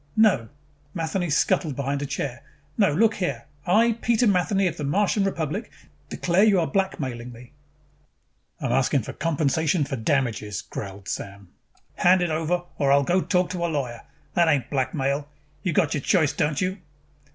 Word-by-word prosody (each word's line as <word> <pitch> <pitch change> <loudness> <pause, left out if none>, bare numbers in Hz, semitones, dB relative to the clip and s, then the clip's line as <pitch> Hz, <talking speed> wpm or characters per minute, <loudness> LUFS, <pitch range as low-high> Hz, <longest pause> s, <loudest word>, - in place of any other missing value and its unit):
"No!" 190 - +4 0.5
Matheny 170 +1 -1
scuttled 150 0 +1
behind 140 +1 -2
a 145 - -3
chair. 135 -1 -4 0.3
"No, 200 -6 +3
look 220 +8 +2
here! 140 -11 -2 0.2
I, 225 +5 +3
Peter 235 +1 +2
Matheny 195 -1 +2
of 175 - -1
the 150 - -4
Martian 200 +7 +1
Republic, 185 - -2 0.4
declare 180 +3 +2
you 205 -4 +5
are 165 - +1
blackmailing 135 - -2
me!" 120 +1 -13 1.1
"I'm 135 -6 -2
asking 130 0 +2
compensation 155 - 0
for 135 -1 -3
damages," 110 -5 -1
growled 100 -1 -8
Sam. 100 -1 -6 0.5
"Hand 180 0 +4
it 175 - -1
over 165 +3 0 0.2
or 140 -1 +3
I'll 140 0 +5
go 180 +6 +2
talk 180 -2 +1
to 175 -2 -3
a - - +2
lawyer. 130 -7 -3 0.3
That 170 -1 +3
ain't 140 -6 +1
blackmail. 140 +1 -1 0.3
You 185 - -1
got 160 -2 +2
your 145 - -1
choice, 155 -1 +2
don't 150 0 0
you?" 190 +1 -1
155 Hz, 165 wpm, -24 LUFS, 135-185 Hz, 1.1 s, you